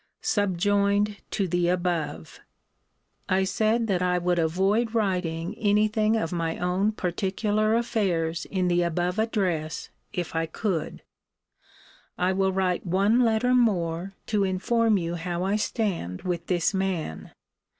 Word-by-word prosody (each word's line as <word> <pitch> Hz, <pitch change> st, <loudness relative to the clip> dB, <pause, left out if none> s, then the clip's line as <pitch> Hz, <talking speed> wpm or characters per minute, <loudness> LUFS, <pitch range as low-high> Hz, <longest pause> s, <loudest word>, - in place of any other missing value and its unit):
SUBJOINED 205 Hz, +1 st, +1 dB
TO 195 Hz, -3 st, -1 dB
THE 175 Hz, 0 st, +1 dB
ABOVE. 175 Hz, -, -2 dB, 0.9 s
I 190 Hz, +1 st, +3 dB
said, 220 Hz, +4 st, +1 dB
that 190 Hz, -5 st, 0 dB
I 180 Hz, 0 st, +2 dB
would 175 Hz, 0 st, +1 dB
avoid 195 Hz, +8 st, +1 dB
writing 180 Hz, -4 st, -1 dB
any 210 Hz, 0 st, +3 dB
thing 215 Hz, +1 st, +1 dB
of 165 Hz, -7 st, -2 dB
my 165 Hz, -2 st, -2 dB
own 185 Hz, +4 st, +1 dB
particular 210 Hz, +3 st, 0 dB
affairs 180 Hz, -8 st, 0 dB
in 185 Hz, -2 st, -1 dB
the 175 Hz, 0 st, +2 dB
above 175 Hz, +3 st, -1 dB
address, 180 Hz, -9 st, -1 dB, 0.2 s
if 175 Hz, -2 st, -4 dB
I 165 Hz, 0 st, 0 dB
could. 165 Hz, -1 st, -3 dB, 1.1 s
I 180 Hz, +1 st, +1 dB
will 190 Hz, 0 st, +1 dB
write 185 Hz, -2 st, 0 dB
one 195 Hz, +6 st, +2 dB
letter 240 Hz, +1 st, +3 dB
more, 190 Hz, -6 st, +1 dB
to 210 Hz, -2 st, +1 dB
inform 220 Hz, +4 st, +2 dB
you 170 Hz, -2 st, -2 dB
how 175 Hz, +1 st, -3 dB
I 195 Hz, +2 st, +1 dB
stand 200 Hz, -, -2 dB
with 175 Hz, -2 st, -3 dB
this 175 Hz, +1 st, +1 dB
man. 190 Hz, -, -3 dB
190 Hz, 135 wpm, -26 LUFS, 175-210 Hz, 1.1 s, I